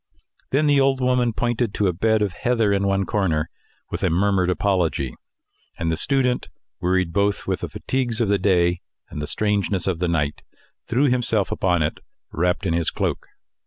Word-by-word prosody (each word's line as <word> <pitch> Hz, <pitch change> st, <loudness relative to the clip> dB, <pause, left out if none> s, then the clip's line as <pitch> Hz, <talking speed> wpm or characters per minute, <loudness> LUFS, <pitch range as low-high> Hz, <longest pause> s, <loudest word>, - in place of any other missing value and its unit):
Then 145 Hz, +3 st, +2 dB
the 145 Hz, -1 st, +4 dB
old 135 Hz, -1 st, +2 dB
woman 125 Hz, -2 st, +2 dB
pointed 120 Hz, -1 st, -1 dB
to 105 Hz, -, +1 dB
a 90 Hz, -, +2 dB
bed 110 Hz, +4 st, +2 dB
of 100 Hz, -4 st, -2 dB
heather 115 Hz, +1 st, +1 dB
in 100 Hz, 0 st, +1 dB
one 95 Hz, 0 st, +1 dB
corner 80 Hz, -7 st, 0 dB, 0.4 s
with -, -, -3 dB
a -, -, +2 dB
murmured 95 Hz, +1 st, +2 dB
apology; 90 Hz, -8 st, 0 dB, 0.6 s
and 85 Hz, 0 st, -1 dB
the -, -, +1 dB
student, 125 Hz, -, +1 dB, 0.3 s
wearied 90 Hz, -1 st, 0 dB
both 100 Hz, 0 st, +1 dB
with -, -, -1 dB
the -, -, -5 dB
fatigues 125 Hz, -4 st, -2 dB
of 115 Hz, -, +2 dB
the 100 Hz, 0 st, +2 dB
day 90 Hz, -2 st, +2 dB, 0.3 s
and 75 Hz, -, -5 dB
the 75 Hz, -, -4 dB
strangeness 100 Hz, +1 st, 0 dB
of 90 Hz, -4 st, -1 dB
the 90 Hz, -, 0 dB
night, 75 Hz, -4 st, -1 dB, 0.5 s
threw 125 Hz, +4 st, +1 dB
himself 120 Hz, -5 st, +1 dB
upon 90 Hz, -3 st, +1 dB
it, 75 Hz, -, -2 dB, 0.3 s
wrapped 90 Hz, +4 st, 0 dB
in 85 Hz, -, +1 dB
his 85 Hz, -1 st, +1 dB
cloak. -, -, -3 dB
100 Hz, 185 wpm, -22 LUFS, 90-115 Hz, 0.6 s, the